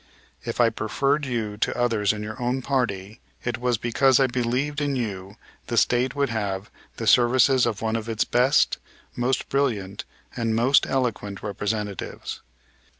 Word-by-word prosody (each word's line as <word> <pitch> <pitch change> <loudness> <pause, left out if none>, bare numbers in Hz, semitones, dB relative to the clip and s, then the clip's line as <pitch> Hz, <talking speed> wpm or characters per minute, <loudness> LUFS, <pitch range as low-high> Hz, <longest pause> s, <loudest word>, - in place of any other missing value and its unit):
If - - -5
I 115 -1 +5
preferred 135 +7 0
you 110 -4 -3
to - - -1
others 115 -4 +2
in 105 0 -5
your 110 +4 -7
own 125 +2 -1
party 110 -6 -2 0.2
it 120 -1 -2
was 125 -1 +1
because 125 +4 +3
I 135 - +5
believed 130 +4 -1
in 145 -1 0
you 100 -5 -4 0.3
the 120 - -2
State 125 +3 +2
would 140 -2 +1
have 100 -3 -3 0.3
the - - -4
services 125 +1 +5
of 110 -2 -3
one 110 0 0
of 115 0 -3
its 110 -1 +1
best, 130 +4 +2 0.4
most 125 +1 0
brilliant 105 -9 -1 0.3
and 115 -2 0
most 125 +5 +4
eloquent 115 -6 -2
representatives. 105 0 -4
120 Hz, 155 wpm, -24 LUFS, 105-130 Hz, 0.4 s, I